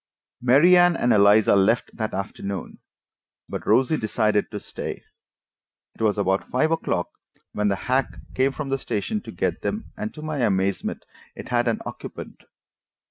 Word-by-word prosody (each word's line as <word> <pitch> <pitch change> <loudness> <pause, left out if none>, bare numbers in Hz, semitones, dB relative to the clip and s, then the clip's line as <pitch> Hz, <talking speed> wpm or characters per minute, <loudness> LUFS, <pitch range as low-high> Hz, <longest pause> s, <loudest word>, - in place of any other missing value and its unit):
Mary 140 +9 +6
Anne 175 -1 +5
and 120 -1 +2
Eliza 100 0 +5
left 100 +5 +2
that 110 -2 -3
afternoon, 100 -1 -5 0.7
but - - -6
Rosie 135 +5 +3
decided 105 -2 0
to 105 - -5
stay. - - -7 0.9
It - - -13
was 110 -2 +2
about 95 -1 0
five 155 +6 +1
o'clock 160 - -1 0.4
when 105 0 0
the 100 - +2
hack 130 +1 0 0.2
came 135 +1 +2
from 140 0 -5
the 135 0 0
station 120 - -2
to - - -9
get - - -2
them, 215 +2 -4
and, 215 -1 -4
to 155 - -9
my 155 -2 -3
amazement, 95 -4 0 0.3
it - - -9
had 120 0 +1
an 115 - 0
occupant. - - -9
120 Hz, 160 wpm, -24 LUFS, 100-145 Hz, 0.9 s, Mary